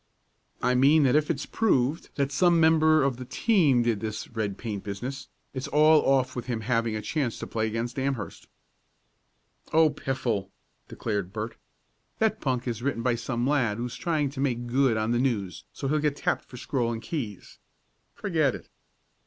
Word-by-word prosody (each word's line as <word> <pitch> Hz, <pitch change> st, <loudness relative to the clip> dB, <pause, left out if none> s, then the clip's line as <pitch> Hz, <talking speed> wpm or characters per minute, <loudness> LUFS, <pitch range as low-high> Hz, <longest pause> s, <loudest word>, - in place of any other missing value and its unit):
"I 125 Hz, +1 st, +3 dB
mean 140 Hz, +5 st, +5 dB
that 135 Hz, 0 st, +3 dB
if 150 Hz, 0 st, +2 dB
it's 145 Hz, -4 st, -1 dB
proved 150 Hz, -, +1 dB
that 140 Hz, -1 st, 0 dB
some 170 Hz, +3 st, +4 dB
member 160 Hz, -1 st, +5 dB
of 135 Hz, -3 st, 0 dB
the 125 Hz, -, -7 dB
team 150 Hz, -, +3 dB
did 115 Hz, -3 st, +1 dB
this 110 Hz, 0 st, -4 dB
red 110 Hz, -4 st, -3 dB
paint 105 Hz, -4 st, -5 dB
business 125 Hz, +7 st, -5 dB, 0.3 s
it's 130 Hz, -1 st, -4 dB
all 155 Hz, +1 st, +5 dB
off 130 Hz, -2 st, +2 dB
with 120 Hz, -1 st, -5 dB
him 120 Hz, -3 st, -2 dB
having 115 Hz, -1 st, 0 dB
a 105 Hz, -, -4 dB
chance 130 Hz, -1 st, -1 dB
to -, -, -5 dB
play 110 Hz, -1 st, -1 dB
against 115 Hz, +4 st, -3 dB
Amherst." 130 Hz, -6 st, -3 dB, 1.2 s
"Oh, 160 Hz, -1 st, +5 dB
piffle!" 130 Hz, -9 st, -2 dB, 0.4 s
declared 100 Hz, -5 st, -3 dB
Bert. 110 Hz, +2 st, -5 dB, 0.6 s
"That 220 Hz, 0 st, +1 dB
punk 130 Hz, -3 st, -1 dB
is 120 Hz, -1 st, -3 dB
written 130 Hz, -3 st, -1 dB
by 125 Hz, 0 st, +2 dB
some 120 Hz, +1 st, -2 dB
lad 125 Hz, -7 st, +1 dB
who's 120 Hz, +1 st, -4 dB
trying 155 Hz, -5 st, -1 dB
to 140 Hz, -, -8 dB
make 120 Hz, -3 st, 0 dB
good 125 Hz, -1 st, +2 dB
on 110 Hz, +1 st, 0 dB
the 120 Hz, -, +2 dB
News 105 Hz, -, -1 dB
so 135 Hz, -, -5 dB
he'll 155 Hz, +3 st, +1 dB
get 150 Hz, -1 st, 0 dB
tapped -, -, -1 dB
for 125 Hz, -, -11 dB
Scroll 130 Hz, -2 st, -1 dB
and 115 Hz, -, -3 dB
Keys. 115 Hz, -, -6 dB, 0.6 s
Forget 165 Hz, -, +1 dB
it." -, -, -12 dB
130 Hz, 180 wpm, -27 LUFS, 115-145 Hz, 1.2 s, mean